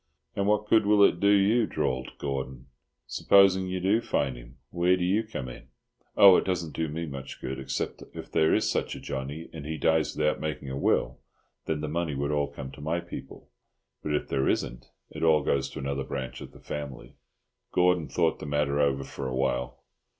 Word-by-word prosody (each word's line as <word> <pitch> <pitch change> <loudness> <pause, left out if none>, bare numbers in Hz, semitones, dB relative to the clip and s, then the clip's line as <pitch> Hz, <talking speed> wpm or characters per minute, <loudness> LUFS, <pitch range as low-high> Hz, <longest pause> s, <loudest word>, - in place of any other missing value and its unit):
"And 100 0 0
what 105 0 +2
good 110 -1 +4
will 105 -1 +6
it 85 - +4
do 100 - +3
you," 105 +3 +4
drawled 65 0 -2
Gordon, 65 -2 -4 0.4
"supposing 95 -1 +4
you 95 0 -2
do 100 +5 +2
find 70 - -1
him? - - -13
Where 90 +1 +3
do 90 - -2
you 95 +5 +2
come 105 - -6
in?" - - -10 0.5
"Oh, 95 -2 +9
it - - +1
doesn't 90 -4 -2
do 80 - -1
me 80 +3 -4
much 70 -3 -8
good, 65 +1 -5
except 70 0 -3
that - - -13
if - - -8
there 80 - +3
is - - +2
such - - -1
a - - -7
Johnny, 70 +4 -5
and 80 -3 -7
he 80 +2 -4
dies 80 -1 +1
without 75 0 +1
making 75 -3 -4
a - - -3
will, 70 - +1 0.5
then 75 -2 -1
the 75 - -3
money 80 -1 -2
would 70 +2 -1
all 75 -1 +1
come 70 -2 -8
to 70 - -12
my 80 +3 -1
people. 85 0 -10 0.5
But 75 - -1
if - - -2
there 65 -1 +1
isn't, - - -2 0.2
it - - -8
all 80 -3 +4
goes 70 -1 0
to - - -10
another 70 0 -2
branch 65 -1 -5
of - - -9
the - - -16
family." 70 -3 -7 0.6
Gordon 90 -3 +3
thought 80 -2 +1
the - - -7
matter 75 0 0
over 70 -1 +2
for 70 0 -6
a 65 - -3
while. 65 -1 -1
75 Hz, 210 wpm, -27 LUFS, 70-90 Hz, 0.6 s, Oh